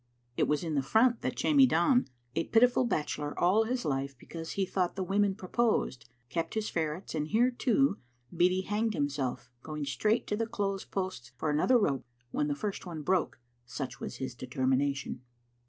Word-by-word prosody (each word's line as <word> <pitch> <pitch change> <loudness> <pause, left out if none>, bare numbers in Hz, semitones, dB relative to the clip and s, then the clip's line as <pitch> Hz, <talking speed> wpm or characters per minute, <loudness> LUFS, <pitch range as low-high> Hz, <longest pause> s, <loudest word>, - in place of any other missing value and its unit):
It - - +2
was 150 +3 +1
in 165 -2 -2
the 140 - +2
front 225 - +3
that - - -2
Jamie 280 -4 +5
Don, 210 - +3 0.3
a 165 - 0
pitiful 245 +2 +4
bachelor 150 -7 -2
all 200 +6 +4
his 245 +2 -2
life 135 -1 -2
because 165 +6 -7
he 195 - 0
thought 185 -1 -1
the 190 - -2
women 195 +1 +2
proposed, 190 - 0 0.2
kept 165 - -3
his 220 -1 -1
ferrets, 160 +2 -2
and 150 -1 -1
here, 235 +7 +3
too, 250 -1 +2 0.4
Beattie 180 +2 +3
hanged 215 +1 0
himself, 130 -4 -2
going 150 -1 -5
straight 210 - +1
to 210 - -1
the 225 +1 -1
clothes 200 -4 -2
posts 185 -11 -4
for 150 +4 -1
another 160 +12 +4
rope 140 - +1 0.3
when 150 - 0
the 145 - -1
first 205 +6 -4
one 165 -4 -6
broke, 180 -5 0 0.3
such 125 0 -5
was - - -5
his 130 -2 -4
determination. 130 +2 -1
175 Hz, 180 wpm, -30 LUFS, 145-215 Hz, 0.4 s, Jamie